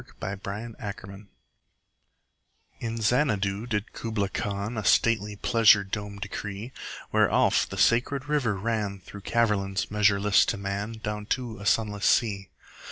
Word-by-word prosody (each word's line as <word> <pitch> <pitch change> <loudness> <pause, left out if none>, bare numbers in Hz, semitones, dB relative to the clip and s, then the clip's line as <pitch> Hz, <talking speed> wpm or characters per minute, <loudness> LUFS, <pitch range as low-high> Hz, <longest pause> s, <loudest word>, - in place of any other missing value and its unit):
Kubla 95 +1 -7 0.4
Khan 100 0 -8 1.5
IN 115 -1 -4
Xanadu 105 -3 +1
did 105 -3 -3
Kubla 105 -4 -2
Khan 100 +2 -3
A 110 - -3
stately 105 +2 +2
pleasure 110 -2 +5
dome 100 +1 -5
decree: 105 +2 -6 0.4
Where - - +4
Alph, - - +3
the - - -6
sacred 130 +4 +2
river, 140 -8 +1
ran 105 -2 -2
Through 100 +2 -11
caverns 100 -4 0
measureless 105 -1 +4
to - - 0
man 100 +2 -3
Down 105 0 -4
to 120 -5 -2
a 100 - -5
sunless 105 -2 +1
sea. 100 -4 +2
105 Hz, 130 wpm, -27 LUFS, 100-115 Hz, 1.5 s, pleasure